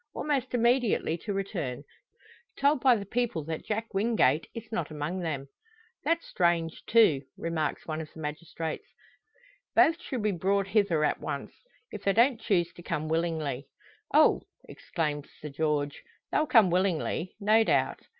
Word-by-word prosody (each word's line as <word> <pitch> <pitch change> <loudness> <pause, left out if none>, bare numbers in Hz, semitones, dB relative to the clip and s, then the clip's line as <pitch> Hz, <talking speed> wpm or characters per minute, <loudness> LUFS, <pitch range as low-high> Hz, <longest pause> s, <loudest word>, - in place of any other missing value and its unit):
Almost 265 -4 -1
immediately 235 -7 +2
to 210 - -5
return 180 - -3 0.7
told 280 -1 +3
by 255 -3 +6
the 200 -3 -4
people 225 -6 -1
that 160 +1 -5
Jack 220 +1 -3
Wingate 195 - +2
is 230 - -8
not 175 -8 -2
among 155 +4 -3
them. 145 -6 -3 0.6
"That's 335 0 +1
strange, 170 -2 0
too!" 215 -12 +5 0.2
remarks 165 -2 -2
one 155 0 -3
of 155 - -9
the - - -13
magistrates. 160 +1 -5 0.9
"Both 330 +2 +5
should 250 -10 -4
be 210 - +2
brought 195 +2 0
hither 190 -7 +2
at - - +1
once - - -5 0.4
if 210 - -7
they 195 - +2
don't 235 +1 +3
choose 175 -5 +1
to - - -12
come 155 -2 -3
willingly." 160 -5 -1 0.4
"Oh!" - - +5 0.3
exclaims 150 -3 -3
Sir 150 - -7
George, 145 -1 -1 0.3
"they'll 305 - +2
come 220 -10 +5
willingly," 180 -1 0
no 215 +2 +4
doubt. - - +1
175 Hz, 150 wpm, -28 LUFS, 155-225 Hz, 0.9 s, by